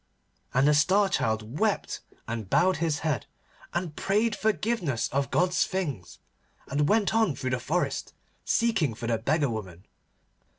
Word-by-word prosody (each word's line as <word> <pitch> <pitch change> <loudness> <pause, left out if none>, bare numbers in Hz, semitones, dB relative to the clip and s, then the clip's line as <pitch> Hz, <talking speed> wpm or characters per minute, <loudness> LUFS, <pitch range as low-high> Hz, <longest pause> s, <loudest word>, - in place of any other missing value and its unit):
And 130 +3 +3
the 150 - +5
Star 190 +7 +4
Child 110 - -1
wept 215 -2 0 0.3
and 115 -4 -4
bowed 185 - +3
his 160 -3 -1
head, 145 -9 -1 0.4
and 175 -3 -3
prayed 210 +3 +1
forgiveness 205 - 0
of 140 0 -1
God's 180 +3 +2
things, 145 - -4 0.5
and 145 +1 0
went 210 -1 +3
on 220 -9 +2
through 130 - -3
the 125 - 0
forest, 165 +8 -2 0.3
seeking 195 - +1
for 120 - -6
the 115 -1 0
beggar 140 +2 +1
woman. 95 -5 -7
150 Hz, 145 wpm, -27 LUFS, 120-190 Hz, 0.5 s, the